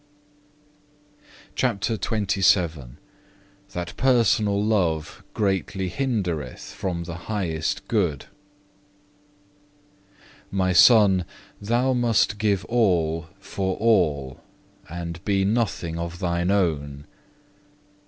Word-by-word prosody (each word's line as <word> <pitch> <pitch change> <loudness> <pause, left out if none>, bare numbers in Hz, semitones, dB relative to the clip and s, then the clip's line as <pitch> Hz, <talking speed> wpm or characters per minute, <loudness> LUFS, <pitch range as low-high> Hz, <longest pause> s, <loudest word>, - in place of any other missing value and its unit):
CHAPTER 115 -3 0
XXVII 95 - +1 0.8
That 90 -2 -5
personal 110 -5 +2
love 85 -8 -1
greatly 95 -2 -1
hindereth 90 - -3
from 85 -3 -3
the 85 0 -7 0.2
highest 95 -1 -2
good 90 - 0 2.2
"My 95 -1 0
Son, 100 -3 +6 0.4
thou 120 +5 +1
must 115 -4 +1
give 105 -2 +1
all 85 -9 +1
for 95 -1 -3
all, 75 - +1 0.5
and 85 +1 -6
be 100 -2 +1
nothing 95 -6 -1
of 85 +1 -5
thine 85 -1 -1
own. 75 -7 -1
95 Hz, 85 wpm, -24 LUFS, 85-105 Hz, 2.2 s, Son